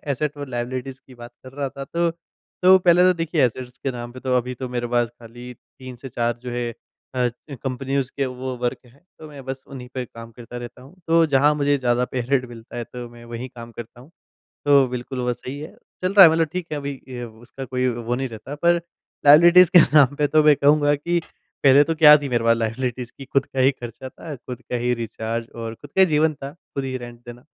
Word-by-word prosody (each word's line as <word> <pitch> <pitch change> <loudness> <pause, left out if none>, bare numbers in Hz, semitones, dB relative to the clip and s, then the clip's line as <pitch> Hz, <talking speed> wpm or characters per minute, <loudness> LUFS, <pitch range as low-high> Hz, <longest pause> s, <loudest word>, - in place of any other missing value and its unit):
Asset 150 +2 -2
और 145 -1 -7
liabilities 130 +2 -4
की 130 - -15
बात 120 0 -11
कर 130 - -11
रहा 140 0 -3
था 135 +1 -8
तो 170 0 +2 0.5
तो 185 +1 +7
पहले 180 -1 +4
तो 185 - +6
देखिए 165 -3 +1
एसेट्स 125 +1 -3
के 135 - 0
नाम 120 -1 -7
पे 130 - -10
तो 130 0 -1
अभी 125 +1 -2
तो 130 +1 -6
मेरे 120 -1 -3
पास 120 -1 +2
खाली 120 +2 -10 0.3
3 130 -1 -9
से 135 +3 -9
4 120 -1 -1
जो 125 - -6
है 120 -1 -2 0.4
अ, 125 -1 +1 0.2
कंपनीज़ 135 +1 -3
के 140 - 0
वो 130 0 -5
वर्क 120 - -1
है 120 +3 -22 0.2
तो 155 - -11
मैं 140 -3 -11
बस 135 0 -6
उन्ही 130 -2 -9
पे 130 -1 -3
कम 115 -1 -12
करता 120 0 -10
रहता 120 +1 -9
हूँ। 140 +8 -16
तो 165 0 +4
जहाँ 145 +3 +5
मुझे 145 -1 +1
ज़्यादा 125 -1 +1
पे 130 - -1
रेट 135 -2 +2
मिलता 115 0 -11
है 120 - -3
तो 120 +1 -9
मैं 120 0 -14
वहीं 125 +3 -5
काम 120 -1 -11
करता 120 +1 -10
हूँ। 135 +6 -16 0.6
तो 140 -2 +5
बिल्कुल 125 +1 -5
वो 125 0 0
सही 130 +3 -8
है 155 +2 -9 0.3
चल 185 +1 0
रहा 195 -2 +10
है 160 - +6
मतलब 165 0 +2
ठीक 180 -2 -4
है 150 - -2
अभी 140 -1 -4 0.2
अ, 120 - -4
उसका 120 +4 -10
कोई 130 0 -1
वो 120 0 -2
नहीं 135 +1 -2
रहता। 115 +5 -8
पर 170 +3 +2 0.4
लायबिलिटीज़ 170 +4 +8
के - - +11
नाम 145 -2 +5
पे 145 0 +1
तो 155 +1 +3
मैं 150 -1 +6
कहूँगा 145 +1 +3
कि 170 +4 -1 0.4
पहले 140 +1 +7
तो 165 - -1
क्या 150 -1 +9
थी 140 - -4
मेरे 120 -2 0
पास 115 0 +3
लायबिलिटीज़ 120 +2 -3
कि 135 - -9
खुद 135 0 0
का 135 - -6
ही 130 +1 +5
खर्चा 125 0 -9
था, 155 +3 -9
खुद 125 -1 -9
का 125 - -5
ही 120 +1 0
रिचार्ज 115 0 -4
और 115 -1 -5
खुद 145 - -14
का - - +1
ही - - +8
जीवन 155 0 +2
था 140 -1 -8
खुद 140 -5 -7
ही 130 -1 -3
रेंट 120 -1 -10
देना। 120 +1 -10
130 Hz, 240 wpm, -22 LUFS, 120-145 Hz, 0.6 s, के